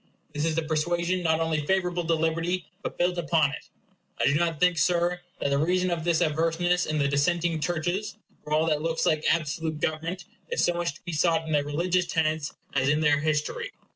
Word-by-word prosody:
This 150 +1 -1
is 160 -1 0
a 165 - +1
persuasion 170 +3 0
not 160 -2 +2
only 160 -2 0
favorable 180 +1 0
to 165 0 +2
libert 165 +1 0
y, 180 -1 -1 0.2
but - - -5
built 175 0 +1
upon 160 -4 +2
it. - - -9 0.5
I - - +2
do 140 - +4
not 165 0 0
think, 180 -2 +3
Sir, 175 +2 +1 0.2
that - - 0
the 140 - +2
reason 180 +3 +1
of 165 -2 -2
this 170 -1 +2
averseness 165 +3 +1
in 155 - -1
the 140 -2 +2
dissenting 165 +4 +1
churches 175 +6 -2 0.3
from 150 0 -1
all 155 +1 +3
that 155 -2 +1
looks 165 0 -1
like 155 -1 +2
absolute 160 -1 -1
government 160 +5 -2 0.2
is 475 - 0
so 175 - +2
much 170 -3 -2
to - - -17
be 175 - -5
sought 160 +1 +2
in 160 - -5
their 145 -2 +2
religious 175 +5 0
tenets, 155 -2 0 0.2
as 135 0 +2
in 150 +2 +2
their 150 -2 +3
history. 155 0 -1
165 Hz, 215 wpm, -26 LUFS, 155-175 Hz, 0.5 s, do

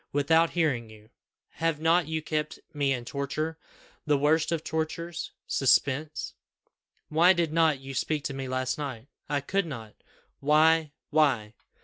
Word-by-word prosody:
Without 160 +4 +3
hearing 130 -9 +1
you! 110 +1 -16 0.4
Have 165 -2 -1
not 165 0 +3
you 160 -1 -2
kept 155 -1 -2 0.2
me 145 -2 +1
in 125 -3 -2
torture, 155 +4 -3 0.4
the 150 -1 +2
worst 155 +4 +2
of 165 -2 -1
tortures 160 +1 -3
suspense? 140 +3 +1 0.8
Why 170 +4 +5
did 170 -3 0
not 160 -4 +3
you 135 0 -8
speak 150 +2 -1
to 140 - -3
me 135 -1 -5
last 130 +1 -2
night?" 135 -3 -6 0.2
"I 145 -1 0
could 195 +6 -1
not." 115 -7 -7 0.5
"Why, 155 +1 +4 0.2
why?" 135 -9 +2
150 Hz, 145 wpm, -28 LUFS, 135-160 Hz, 0.8 s, Why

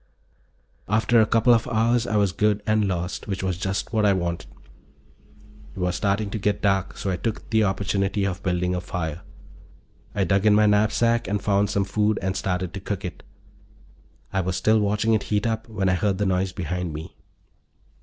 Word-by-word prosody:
After 110 +2 +4
a 110 - +3
couple 115 +2 +4
of 115 0 +1
hours 120 0 +1
I 110 - -1
was 100 -2 +2
good 105 +2 +1
and 110 -1 +2
lost, 90 -1 -3
which 95 -2 -3
was 95 -1 0
just 95 +4 -3
what 110 -1 +2
I 100 -1 +4
wanted. 85 -2 -3 1.3
It - - -8
was 90 0 0
starting 100 +2 0
to 110 - -3
get 100 0 0
dark, 95 -2 +1
so 95 - -2
I 90 - -1
took 110 +3 -4
the 110 -1 +4
opportunity 100 0 0
of 95 -1 -3
building 90 -1 0
a 90 - -2
fire. 85 -3 -4 0.9
I 100 - +2
dug 95 +3 +2
in 105 - +6
my 105 0 +5
knapsack 110 +3 +2
and 105 +1 0
found 100 0 +1
some 100 -1 0
food 105 +2 +1
and 95 +1 -1
started 90 -2 -2
to 100 - -5
cook 100 0 -4
it. 90 - -6 1.1
I 95 - +1
was 95 0 -2
still 110 +3 +3
watching 105 +2 +1
it 110 - +2
heat 105 0 +1
up 115 0 -2
when 105 -3 -1
I 95 - +3
heard 95 +1 0
the 105 - 0
noise 95 0 0
behind 90 -2 -4
me. 80 +2 -8
100 Hz, 195 wpm, -24 LUFS, 95-105 Hz, 1.3 s, in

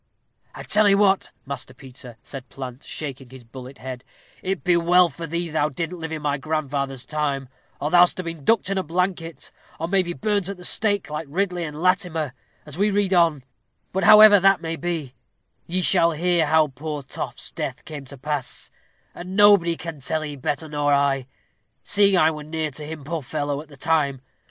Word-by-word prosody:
"I - - -7
tell 210 0 +3
'ee 200 - +6
what, 200 -1 +3 0.2
Master 135 -1 -7
Peter," 125 -3 -12
said 135 -2 -8
Plant, 130 -1 -8
shaking 135 -4 -6
his 130 -1 -12
bullet 130 +3 -11
head, 130 -1 -7 0.4
"it 190 -1 -3
be 180 -1 +3
well 175 +1 +4
for 165 +3 -7
thee 170 +2 -2
thou 150 -1 +1
didn't 165 +5 -4
live 160 -1 -5
in 155 -2 -5
my 145 -1 0
grandfather's 140 -4 -2
time, 140 -2 -2 0.3
or 150 - -2
thou'dst 175 +1 +5
ha' - - -2
been 165 -3 -6
ducked 225 +2 +2
in 195 - +1
a - - +1
blanket; 170 -2 -3 0.3
or 165 - -2
may 190 +2 +3
be 175 -1 -4
burnt 205 -1 -1
at 200 - -5
the 180 - -8
stake, 205 -6 +1
like 150 0 -4
Ridley 180 +2 -1
and 150 -1 -7
Latimer, 180 -6 +1 0.3
as 150 +3 -9
we 205 +1 +3
read 200 -1 +1
on 165 -6 +3 0.5
but 190 - 0
however 215 -1 +9
that 195 0 +4
may 165 0 -4
be, 165 -7 -4 0.5
ye 185 +2 0
shall 170 -3 +4
hear 170 0 +1
how 155 0 +4
poor 150 +2 -6
Toft's 130 - -6
death - - -5
came 145 -3 -8
to 140 +1 -10
pass, 145 0 -4 0.4
and 180 +2 -7
nobody 200 -5 +5
can 165 -3 -7
tell 155 +4 -2
'ee 145 -1 -6
better 145 +3 -3
nor 145 -1 0
I, 135 -2 +1 0.6
seeing 200 -2 +3
I 160 -2 +5
were 155 -1 -7
near 155 0 -3
to 150 +2 -8
him, 155 -2 -7
poor 160 +3 -3
fellow, 145 +1 -3
at 155 - -14
the 145 -2 -15
time. 140 -3 0
160 Hz, 200 wpm, -23 LUFS, 140-180 Hz, 0.6 s, however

